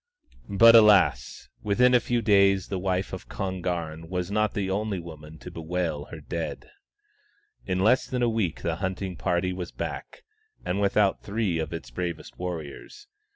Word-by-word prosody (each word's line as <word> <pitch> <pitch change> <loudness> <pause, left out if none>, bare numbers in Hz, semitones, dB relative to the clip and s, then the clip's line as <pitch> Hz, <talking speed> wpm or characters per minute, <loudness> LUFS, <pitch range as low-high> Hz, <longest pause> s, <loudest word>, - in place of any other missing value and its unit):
But 115 +4 +7
alas! 100 - +4
within 125 +5 +3
a 125 - +6
few 120 0 -1
days 100 -3 +4
the 95 - -2
wife 95 0 -2
of 95 - -7
Kon 95 -2 -4
garn 80 -2 -4
was 90 0 -3
not 110 0 0
the 100 -2 -1
only 100 0 -2
woman 80 -2 -11
to - - -10
bewail 80 -2 -3
her - - -10
dead. 85 - -5 1.0
In 90 - 0
less 115 +6 +3
than 125 -2 -1
a - - +3
week 110 -8 -1
the - - -1
hunting 95 0 -3
party 90 +2 -1
was 90 -1 -6
back, - - -6 0.4
and 95 +3 -1
without 100 0 +2
three 100 -5 -1
of 80 -1 -3
its 70 -8 -7
bravest 85 +4 -5
warriors. 90 - -7
95 Hz, 165 wpm, -26 LUFS, 85-105 Hz, 1.0 s, But